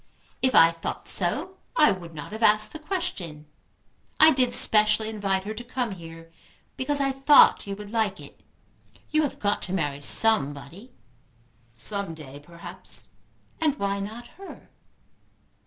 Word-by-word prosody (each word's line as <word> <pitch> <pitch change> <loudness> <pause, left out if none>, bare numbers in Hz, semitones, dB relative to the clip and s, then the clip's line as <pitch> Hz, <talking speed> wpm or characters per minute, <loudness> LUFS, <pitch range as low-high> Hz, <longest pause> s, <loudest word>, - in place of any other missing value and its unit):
If 260 0 +1
I 165 0 +7
thought 165 0 -7
so, 295 - 0 0.2
I 305 -1 +5
would 170 -3 -7
not 150 +4 -8
have 220 +2 -8
asked 215 -1 +4
the 315 - -8
question. 300 - -5 0.7
I 315 0 +8
did 255 -2 +1
specially 215 -1 +4
invite 195 -3 -2
her 210 +2 -5
to 240 - -8
come 245 -1 -4
here 165 -2 -11 0.4
because 285 +2 -1
I 275 -1 +1
thought 270 -4 +5
you 200 - -4
would 205 0 -11
like 220 -4 -1
it. - - -14 0.7
You 310 0 +2
have 290 - -3
got 205 0 -1
to 185 - -4
marry 145 -6 -2
somebody." 175 - 0 0.8
"Some 195 - -4
day, 145 -3 -12
perhaps." 170 +3 -7 0.5
"And 300 -3 +1
why 200 0 -2
not 220 +4 -7
her?" 390 - -12
210 Hz, 150 wpm, -25 LUFS, 170-260 Hz, 0.8 s, I